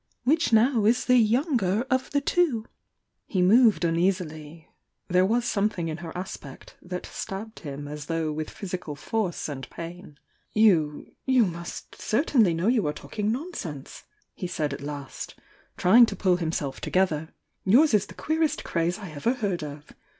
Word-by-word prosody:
— - - -42
which 310 +5 +2
now 230 +1 +4
is 230 +4 +3
the 250 0 +5
'younger' 230 - +2
of 260 0 +1
the 285 - +1
two?" 280 -8 +1 0.6
He 185 -3 +1
moved 220 0 +5
uneasily 165 -2 -1 0.2
— - - -53
there 180 +1 +4
was 235 +3 +1
something 200 -7 0
in 155 - -4
her 170 -1 -7
aspect 165 -7 -8
that 180 0 -6
stabbed 215 +3 -6
him 145 -2 -7
as 150 0 -7
though 165 -2 -1
with 155 +1 -4
physical 180 -6 -6
force 190 +4 -2
and 135 -3 -6
pain. 170 -2 -9 0.4
"You 170 -9 +3
— - - -52
you 235 - +6
must 170 -1 -7
certainly 230 - +3
know 165 +3 -1
you 225 -7 +3
are 150 - 0
talking 210 +5 -3
nonsense!" 225 - -6 0.3
he 180 - -5
said 150 -4 -2
at 140 - -6
last, 145 -1 -6 0.4
trying 230 +6 +7
to 200 - -4
pull 185 -2 +2
himself 160 -5 -3
together. 160 -4 0 0.3
"Yours 250 +9 +5
is 210 -1 +3
the - - -12
queerest 315 0 0
crtze 170 +1 0
I 195 -6 -8
ever 190 - 0
heard 200 -7 -2
of! 145 0 -9
185 Hz, 170 wpm, -26 LUFS, 160-225 Hz, 0.6 s, trying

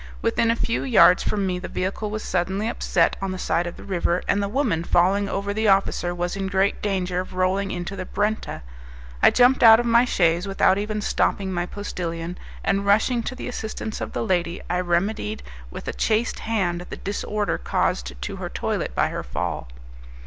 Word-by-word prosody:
Within 230 - +2
a 230 - +3
few 230 0 -1
yards 215 -7 +6
from 205 -2 -1
me 180 -1 -1
the 180 - -6
vehicle 195 +3 -3
was 215 +1 -4
suddenly 190 +4 -1
upset 175 -7 +1
on 195 - -2
the 185 - -4
side 175 -1 0
of 175 - -7
the - - -11
river, 180 -2 0
and 200 - +2
the 200 - -1
woman, 220 - 0
falling 195 +4 +2
over 200 +1 -2
the 220 +1 0
officer, 195 -3 +2
was 175 +1 -2
in 195 -1 -2
great 190 +1 +1
danger 185 -3 -1
of 185 0 -6
rolling 190 +2 +1
into 180 +1 -4
the 185 - -4
Brenta. 210 - -2 0.6
I - - +8
jumped 250 +1 +4
out 225 -1 +9
of 240 - -1
my 235 +1 +5
chaise 175 -4 +1
without 195 0 +3
even 210 +1 -2
stopping 195 -2 0
my 175 0 -1
postillion, 175 -4 -5 0.2
and 200 0 +1
rushing 220 +4 +3
to 255 - -5
the - - -6
assistance 220 -2 -5
of - - -5
the - - -2
lady 175 -3 0
I 180 - +1
remedied 175 - -1 0.3
with - - -9
a - - -2
chaste 220 +2 0
hand 180 -6 -1
the - - -6
disorder 205 +1 -2
caused 65 0 -1
to - - -5
her - - -5
toilet - - -3
by - - +2
her - - -4
fall. - - -4
195 Hz, 200 wpm, -23 LUFS, 175-215 Hz, 0.6 s, out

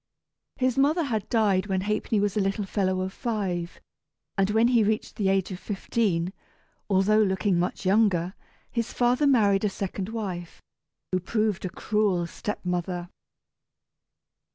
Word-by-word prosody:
His 255 -1 +1
mother 305 +5 +3
had 225 -8 -2
died 205 -4 +2
when 190 -2 0
Ha'penny 210 +1 0
was 205 -1 0
a - - +2
little 195 +1 -1
fellow 185 -1 0
of 190 +1 -3
five, 190 -7 -3 0.6
and 195 -1 +2
when 225 +3 +4
he 235 -3 +4
reached 215 +1 -1
the 195 -2 +1
age 195 0 +1
of 180 - -5
fifteen 195 -4 -1 0.6
(although 200 +2 +4
looking 190 -2 +1
much 180 +2 -2
younger) 190 -3 +3 0.4
his 235 -1 -2
father 250 +4 +2
married 205 -7 +4
a 210 - +2
second 195 0 -4
wife, 190 -7 -5 0.5
who 185 - +2
proved 215 +1 -1
a - - -2
cruel 200 -3 0
step 210 +4 -5
mother. 175 0 -2
200 Hz, 150 wpm, -26 LUFS, 185-220 Hz, 0.6 s, when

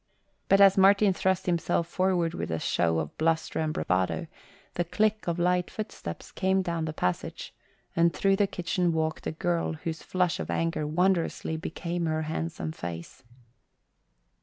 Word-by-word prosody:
But 195 - +6
as 195 -1 +7
Martin 195 +1 +6
thrust 190 0 0
himself 170 -1 +1
forward 175 -1 0
with - - -4
a 80 - -1
show 80 +1 +1
of 80 -2 -3
bluster 160 0 +1
and 155 -1 0
bravado, 90 - 0 0.5
the 175 - 0
click 215 +4 0
of 170 0 0
light 180 0 +1
footsteps 205 - -7
came 190 0 +1
down 170 -3 -2
the 155 - -3
passage, 90 - -3 0.4
and 170 0 +4
through 195 +2 +2
the 205 -1 +3
kitchen 180 -1 -1
walked 160 -1 -1
a - - -1
girl 165 +1 -1
whose 160 0 -5
flush 180 -2 0
of - - -4
anger 165 -2 -1
wondrously 170 0 +1
became 170 +1 -3
her 155 0 0
handsome 160 0 -3
face. 85 - -7
170 Hz, 160 wpm, -28 LUFS, 160-185 Hz, 0.5 s, as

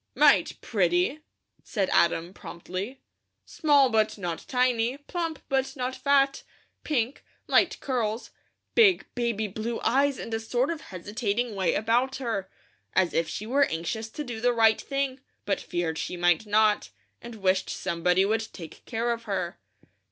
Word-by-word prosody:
"Might - - +4
pretty!" 350 -4 +1 0.4
said 200 -4 -1
Adam, 170 +1 +2
promptly. 190 +9 -7 0.4
"Small, 290 -4 +4
but 220 -1 +2
not 175 -4 -4
tiny; 250 0 +1
plump, 330 +2 -4
but 270 0 0
not 255 -1 -3
fat; 275 +1 +2 0.4
pink, 260 -3 -1 0.2
light - - +3
curls, 235 -4 -2 0.4
big 415 -6 +5
baby 235 -3 -1
blue 220 +4 -4
eyes 275 +1 +2
and 230 - -6
a 225 - 0
sort 245 +6 0
of 325 -3 -5
hesitating 210 +5 -3
way 190 -3 +1
about 240 +5 +1
her, 225 -8 -3 0.5
as 185 -2 +3
if 165 -1 +1
she 210 - -5
were 275 +5 +3
anxious 220 +7 -3
to 300 - -5
do 235 -5 -6
the 245 +1 +3
right 225 -2 +4
thing, 275 -1 -2 0.3
but 200 - 0
feared 165 -2 -2
she 180 - -4
might 175 +4 +2
not, 210 0 +3 0.3
and 235 -1 -9
wished 190 -2 +1
somebody 180 +1 +1
would 220 +2 -1
take 165 -4 -11
care 235 0 -1
of 230 0 -8
her." 190 -4 -3
225 Hz, 150 wpm, -27 LUFS, 195-260 Hz, 0.5 s, big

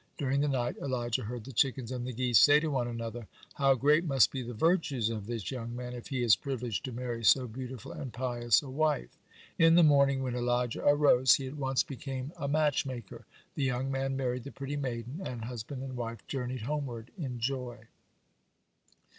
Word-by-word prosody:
During 140 0 0
the 150 - +2
night 125 -3 -1
Elijah 120 -4 -2
heard 120 +1 -5
the 135 - -9
chickens 125 +1 +1
and 125 -1 -4
the - - -3
geese 125 -2 +3
say 145 0 +7
to 155 0 -2
one 125 -3 0
another: 115 -1 -5 0.3
"How 135 -1 +3
great 150 +6 +3
must 135 -8 +4
be 135 - -3
the 120 0 -6
virtues 140 - +1
of 105 -3 -5
this 115 -6 -4
young 120 -2 -5
man, 125 0 -6
if 120 -1 -8
he 130 -3 -2
is 110 -5 +6
privileged 120 0 -4
to 130 - -5
marry 120 -1 -4
so 125 +3 +5
beautiful 125 0 -7
and 130 - -6
pious 120 0 +1
a 140 - -8
wife." 150 - 0 0.4
In 165 0 +6
the 175 - +7
morning, 140 -3 +4
when 130 -2 -2
Elijah 120 -1 0
arose, 145 -3 +5
he 135 - -4
at 130 +3 -6
once 135 -2 +1
became 135 0 -6
a 155 -5 -4
matchmaker, 140 -7 -1 0.3
the 145 - -2
young 135 0 -1
man 135 0 -1
married 125 -2 -2
the 140 - -8
pretty 140 +1 -5
maiden, 130 - -4
and 120 -8 -5
husband 125 +3 -6
and 130 -1 -6
wife 115 -1 -5
journeyed 130 -2 -4
homeward 125 -4 -4
in 135 -10 -4
joy. 125 -2 -3
130 Hz, 195 wpm, -30 LUFS, 120-140 Hz, 0.4 s, say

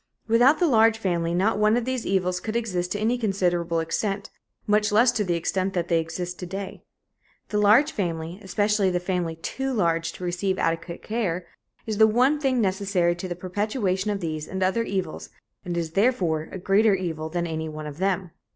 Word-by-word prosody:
Without 245 +7 +5
the 355 - +2
large 225 -6 +4
family, 175 -5 -1
not 205 +4 +1
one 215 +2 +4
of 240 - -1
these 255 -2 -2
evils 180 -1 +1
could 220 0 -5
exist 185 -7 -1
to 205 - -1
any 230 +3 +1
considerable 175 -6 0
extent, 195 +5 -2 0.3
much 210 0 +2
less 230 +4 +5
to 220 -3 0
the 175 -3 0
extent 190 +3 -1
that 175 -1 -1
they 170 -1 +3
exist 175 +2 -5
to 180 - -5
day. 195 +2 -6 0.7
The 210 - 0
large 225 +9 +5
family 170 - -3
especially 205 0 +1
the 180 -1 0
family 175 -2 -2
too 265 +11 -3
large 165 -7 +1
to - - -10
receive 180 +2 -1
adequate 165 +1 -2
care 185 -6 -2 0.4
is 215 -2 -3
the 220 - +8
one 255 +7 +3
thing 265 -3 +1
necessary 190 -3 +1
to 175 +2 -6
the 175 - -4
perpetuation 190 +2 -1
of 205 -1 -2
these 155 -2 -4
and 190 0 -2
other 190 +5 +1
evils 190 -7 -3 0.3
and 175 -1 -3
is 165 -2 -2
therefore 175 -6 +1
a - - -5
greater 200 +3 +3
evil 160 -4 -4
than 175 +1 -2
any 160 -1 -3
one 155 0 -7
of 150 +1 -8
them. 190 -2 0
190 Hz, 195 wpm, -25 LUFS, 175-215 Hz, 0.7 s, the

